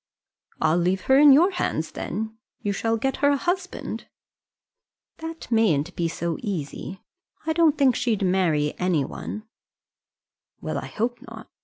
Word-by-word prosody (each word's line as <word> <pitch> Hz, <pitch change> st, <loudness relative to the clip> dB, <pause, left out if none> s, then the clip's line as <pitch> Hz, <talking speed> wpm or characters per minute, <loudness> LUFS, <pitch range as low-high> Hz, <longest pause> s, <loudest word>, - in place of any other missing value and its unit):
"I'll 160 Hz, +2 st, +3 dB
leave 185 Hz, +2 st, +1 dB
her 265 Hz, +6 st, +4 dB
in 290 Hz, -1 st, +9 dB
your 335 Hz, +8 st, +6 dB
hands 160 Hz, -, -2 dB
then; 220 Hz, +4 st, -4 dB, 0.3 s
you 205 Hz, -, 0 dB
shall 225 Hz, +3 st, 0 dB
get 270 Hz, +4 st, -1 dB
her 285 Hz, -, +3 dB
a 285 Hz, -, +3 dB
husband." 365 Hz, +4 st, -3 dB, 1.1 s
"That 325 Hz, -4 st, -7 dB
mayn't 180 Hz, -8 st, +2 dB
be 170 Hz, -, 0 dB
so 170 Hz, 0 st, -3 dB
easy. 190 Hz, -2 st, -5 dB, 0.4 s
I 320 Hz, -, +1 dB
don't 320 Hz, -2 st, +3 dB
think 265 Hz, -4 st, +4 dB
she'd 225 Hz, -5 st, 0 dB
marry 170 Hz, -6 st, +2 dB
anybody." 180 Hz, +4 st, -2 dB, 1.2 s
"Well, -, -, -3 dB
I -, -, -7 dB
hope 240 Hz, +2 st, -2 dB
not. -, -, -11 dB
220 Hz, 145 wpm, -24 LUFS, 175-280 Hz, 1.2 s, in